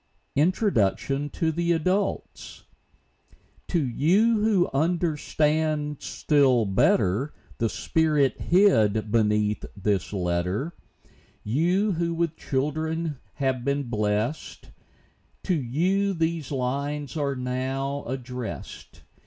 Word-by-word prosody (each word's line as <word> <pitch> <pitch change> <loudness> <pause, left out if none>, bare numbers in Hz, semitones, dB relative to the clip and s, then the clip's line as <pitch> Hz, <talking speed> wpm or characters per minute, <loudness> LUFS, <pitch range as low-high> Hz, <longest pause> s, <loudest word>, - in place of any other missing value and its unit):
INTRODUCTION 145 - +1
TO 160 +3 -1
THE 170 +2 +1
ADULTS. 185 +5 -2 1.0
To 175 - +1
you 195 - +3
who 210 -4 +3
understand 155 -1 0
still 135 -6 +2
better 100 +6 +2 0.2
The 115 - +1
spirit 150 +3 +1
hid 110 - +3
beneath 105 -1 +1
the 100 -1 +1
letter, 90 - -1 0.4
— - - -30 0.2
You, 175 - +1
who 170 -1 -1
with 165 -1 -1
children 155 +2 -2 0.2
have 130 -3 -1
been 140 -2 -1
blessed, 105 +5 -2 0.7
To 185 - 0
you 180 +8 0
these 165 -3 -1
lines 140 +2 -2
are 140 -3 -1
now 130 +2 -2
addressed. 125 -3 -7
145 Hz, 95 wpm, -25 LUFS, 120-165 Hz, 1.0 s, you